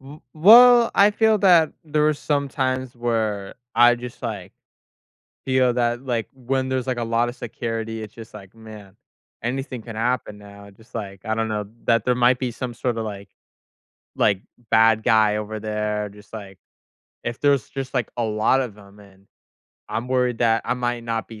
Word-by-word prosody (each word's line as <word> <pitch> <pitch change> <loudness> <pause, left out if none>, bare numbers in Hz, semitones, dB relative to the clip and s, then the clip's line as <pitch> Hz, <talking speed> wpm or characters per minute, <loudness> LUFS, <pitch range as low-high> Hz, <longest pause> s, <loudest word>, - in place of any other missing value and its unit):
W 140 +3 -13
well, 235 +7 +8
I 205 +1 +6
feel 220 0 +2
that 175 -6 +5
there 150 0 0
were 155 0 +4
some 140 -1 -1
times 130 -2 -2
where 110 -4 -2 0.2
I 120 +1 +6
just, 120 +1 -9
like, 105 -6 -5 0.9
feel 130 -1 +2
that, 120 0 0
like, 120 -3 -2
when 130 +1 -2
there's, 130 -1 -2
like, 125 -2 -2
a 120 - -1
lotta 115 +1 0
security, 115 -2 -5
it's 110 -1 -10
just 115 -1 -12
like, 95 +2 -12
"Man, 110 -3 -13 0.5
anything 130 +1 -4
can 115 -1 -9
happen 115 -2 -1
now," 100 0 -13
just 110 +4 -22
like, 100 -4 -6
I 110 - -1
don't 115 0 -1
know, 105 -1 -3 0.2
that 115 -2 +2
there 125 - +2
might 125 +1 +3
be 125 -1 -2
some 120 +1 -6
sorta, 115 -1 -2
like 100 -2 -7 0.9
like, 100 -1 +2 0.3
bad 110 0 +4
guy 110 -1 +3
over 105 0 -4
there, 105 -1 -3
just 105 +2 -17
like 100 -3 -9 0.7
if 120 0 -4
there's 140 -5 +2
just, 135 0 -6
like, 120 -3 -1
a 120 - 0
lot 110 +4 +2
of 120 -6 -5
them, 100 0 -17
and 100 -1 -19 0.6
I'm 115 +3 -4
worried 125 -2 0
that 115 -1 +2
I - - 0
might 120 -1 -3
not 115 -1 -3
be 110 -2 -11
115 Hz, 180 wpm, -22 LUFS, 110-130 Hz, 0.9 s, well